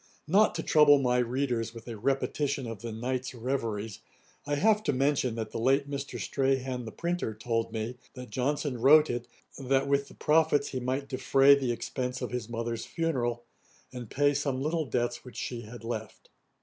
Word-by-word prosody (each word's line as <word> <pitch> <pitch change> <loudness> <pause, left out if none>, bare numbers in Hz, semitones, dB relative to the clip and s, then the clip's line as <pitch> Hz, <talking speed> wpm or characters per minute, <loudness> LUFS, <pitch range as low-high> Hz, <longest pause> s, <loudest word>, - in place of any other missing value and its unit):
Not 200 +7 +4
to - - -2
trouble 150 -2 +6
my 125 -2 +2
readers 120 -2 -1
with 115 - -10
a 115 - -5
repetition 135 +3 -1
of 115 -3 -6
the 115 -1 -5
Knight's 125 +3 -3
reveries, 115 -4 -3 0.5
I 145 - +1
have 210 +7 +3
to - - +2
mention, 130 -2 +1
that 110 -2 -4
the - - -4
late 135 +4 +2
Mr. 140 -1 -5
Strahan 130 -2 -1
the 110 - -6
printer 170 -9 -2
told 115 +1 -2
me, 115 +2 -4 0.2
that 125 -1 -9
Johnson 135 -1 -1
wrote 150 +2 +6
it, 120 0 -4 0.3
that 135 +1 +1
with 140 0 +1
the - - -15
profits 155 -1 +2
he 130 - -3
might 130 +3 -2
defray 135 +1 +5
the 135 -3 +1
expence 125 +2 -3
of - - -4
his 125 -2 -4
mother's 115 0 -3
funeral, 125 -8 -1 0.5
and 120 -3 -7
pay 145 +1 +2
some 140 -2 -1
little 155 +3 -1
debts 120 0 -2
which 125 -3 -12
she 120 -2 -4
had 115 +1 -10
left. 110 -2 -6
130 Hz, 185 wpm, -29 LUFS, 120-140 Hz, 0.5 s, trouble